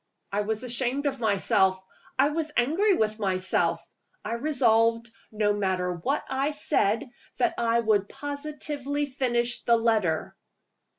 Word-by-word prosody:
I 205 +1 0
was 220 +2 -3
ashamed 250 +3 -1
of 270 -2 -1
myself; 195 -3 +3 0.4
I 275 +2 +4
was 310 0 -2
angry 355 - +3
with 215 -3 0
myself 185 -2 0 0.4
I 220 - -2
resolved, 230 -4 +2 0.2
no 210 -1 +1
matter 185 -3 -1
what 260 - -2
I 270 +2 0
said, 280 -7 0 0.3
that 345 - +2
I 235 0 +2
would 210 -3 +1
positively 290 0 -4
finish 245 -3 -1
the 235 0 +3
letter. 215 -8 0
235 Hz, 130 wpm, -26 LUFS, 210-285 Hz, 0.4 s, I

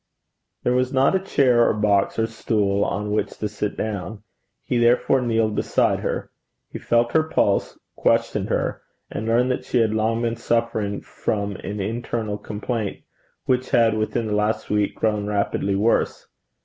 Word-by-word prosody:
There 125 - +2
was 125 0 +1
not 135 +4 +3
a - - +3
chair 130 -10 +3
or - - +1
box 105 -2 +2
or 115 - +2
stool 105 -3 0
on 105 +1 -2
which 105 - -1
to 105 - -2
sit 105 0 -4
down. 105 0 -4 0.4
He 125 - 0
therefore 120 +2 +3
kneeled 115 -3 +1
beside - - +1
her. - - -3 0.4
He - - -6
felt 120 0 +2
her 160 - +4
pulse, 155 -10 0 0.2
questioned - - +1
her, - - -1 0.3
and 110 - -4
learned 120 +3 +3
that 125 - -2
she - - -1
had 110 -2 +3
long 110 +2 0
been 115 0 -1
suffering 115 -3 -1
from 100 -1 -3
an 100 +2 -6
internal 110 0 -3
complaint, 105 0 -4 0.4
which 130 0 0
had 115 -2 +4
within 110 +2 -1
the 105 -1 -1
last 105 +1 -1
week 105 -1 +1
grown 105 -2 0
rapidly 100 -1 0
worse. 110 +4 +1
110 Hz, 165 wpm, -23 LUFS, 105-120 Hz, 0.4 s, her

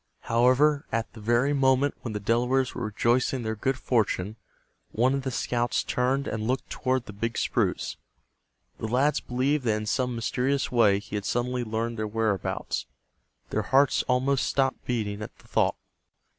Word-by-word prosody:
However, 130 +6 +3
at 115 0 -2
the 110 - -11
very 120 +6 +2
moment 135 0 +3
when 115 - -5
the 105 - -2
Delawares 125 +5 +1
were 125 - -4
rejoicing 120 +5 +1
in 125 - -5
their 110 0 -2
good 135 +5 -1
fortune, 110 -5 0 0.6
one 125 +4 +2
of 140 - 0
the 130 - -3
scouts 120 -1 0
turned 130 +3 0
and 110 0 -3
looked 130 +2 -2
toward 130 -1 -1
the 105 - -9
big 115 +3 -3
spruce. - - 0 0.8
The 110 - -3
lads 135 +6 +2
believed 135 +4 0
that 110 -2 +2
in 110 - -4
some 125 +2 0
mysterious 125 +4 0
way 110 -5 +4
he 105 +1 -10
had 100 - -5
suddenly 125 +1 -1
learned 115 0 -3
their 110 - -1
whereabouts. 110 -3 -2 0.6
Their - - +1
hearts 135 +1 +3
almost 130 +1 +2
stopped 135 -1 0
beating 110 -4 -2
at 105 - -8
the - - -21
thought. - - +2
120 Hz, 170 wpm, -27 LUFS, 110-130 Hz, 0.8 s, way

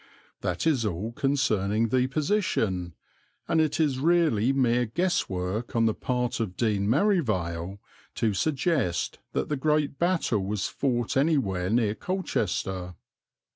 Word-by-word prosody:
That 90 - -2
is 145 -7 +2
all 105 +2 -2
concerning 115 -6 +1
the 130 +2 +2
position, 135 - -1 0.5
and 160 - +3
it 155 0 0
is 145 -5 +1
really 150 -7 +3
mere 125 -3 +2
guess 175 +10 0
work 95 +6 -3
on 115 -1 +3
the 110 - +2
part 125 +1 -2
of 100 -6 -3
Dean 105 -3 +1
Merivale 100 - 0 0.4
to 110 -2 +1
suggest 135 - 0
that - - -1
the 150 - 0
great 150 0 0
battle 170 - +1
was 100 +1 -2
fought 120 -4 -1
anywhere 130 - +1
near 110 -1 +2
Colchester. 95 - -2
120 Hz, 135 wpm, -27 LUFS, 100-150 Hz, 0.5 s, and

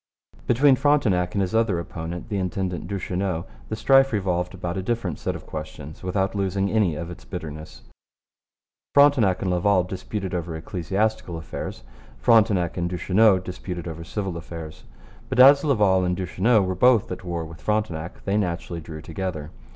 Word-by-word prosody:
Between 135 +3 +5
Frontenac 110 -11 +2
and 100 - +2
his 95 - -3
other 110 -5 +2
opponent, 85 +3 -6
the 100 -2 -1
intendant 90 -2 -3
Duchesneau, 95 -3 -2 0.2
the 110 - -2
strife 135 +4 +4
revolved 90 -4 -1
about 85 -1 -4
a 95 - -2
different 100 -6 -2
set - - -2
of - - -9
questions 75 -1 -8
without 95 +1 -1
losing 100 -1 -1
any 105 -8 +2
of 85 +2 -5
its 85 - -11
bitterness. 75 -8 -8 1.1
Frontenac 135 -11 +5
and 95 - 0
Laval 90 +1 +3
disputed 95 +1 -5
over 85 -2 -3
ecclesiastical 95 +3 -2
affairs. 80 -6 -6 0.3
Frontenac 105 -8 +3
and 85 0 -1
Duchesneau 95 +3 +4
disputed 90 -1 -6
over 80 0 -6
civil 95 0 -4
affairs. 80 -2 -9 0.4
But 130 - -1
as 140 +2 +8
Laval 105 -10 +3
and 90 0 0
Duchesneau 95 +4 +2
were 95 0 -1
both 115 +2 +4
at 90 - -5
war 85 -2 -3
with 80 0 -12
Frontenac 90 -6 -2
they 100 +1 +1
naturally 85 -3 -2
drew 80 0 -9
together. 80 -3 -5
95 Hz, 160 wpm, -24 LUFS, 85-105 Hz, 1.1 s, as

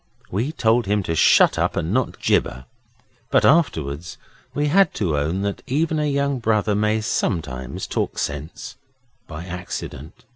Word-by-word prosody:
We 115 +10 -1
told 115 -6 +2
him 105 0 +1
to 80 - -2
shut 80 - +5
up - - 0
and 85 +3 -1
not 130 0 0
gibber, 65 +1 0 0.6
but - - +3
afterwards 80 - +1 0.3
we 145 - -1
had 190 +6 +3
to 90 -8 0
own 80 +7 -1
that 100 -1 -3
even 155 +4 0
a 150 -1 +1
young 140 -1 0
brother 110 -2 +1
may 105 +1 +1
sometimes 65 - -2
talk - - -2
sense 75 +1 -5 0.5
by 80 +1 -7
accident. 90 -4 -7
105 Hz, 150 wpm, -22 LUFS, 80-130 Hz, 0.6 s, shut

